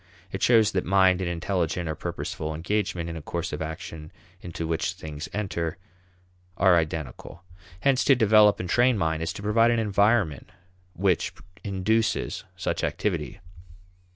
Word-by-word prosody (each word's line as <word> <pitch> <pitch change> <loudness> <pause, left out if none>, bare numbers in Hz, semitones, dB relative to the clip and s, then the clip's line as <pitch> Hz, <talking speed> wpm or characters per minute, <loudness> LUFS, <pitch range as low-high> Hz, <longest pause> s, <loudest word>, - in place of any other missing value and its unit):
It 95 - -5
shows 110 -3 +5
that 95 -2 0
mind 95 0 +3
and 90 - -1
intelligent 85 -1 -1
or 80 - -1
purposeful 80 0 -4
engagement 90 0 -2
in 85 - -5
a 80 - -6
course 85 +2 -4
of 75 - -4
action 80 0 -7 0.3
into 85 -1 -5
which 80 0 -1
things 75 0 -7
enter 90 -6 -3 0.8
are 95 -1 +5
identical. 80 +2 -3 0.4
Hence 135 -2 +3
to 135 - +6
develop 110 -3 +5
and 90 - -3
train 120 +5 +3
mind 80 -3 0
is 80 0 -2
to 100 - -8
provide 115 +3 +4
an 120 - +2
environment 105 - +1 0.5
which 95 -3 +1 0.3
induces 105 +3 0
such - - -2
activity. 80 -10 -2
90 Hz, 150 wpm, -26 LUFS, 80-105 Hz, 0.8 s, to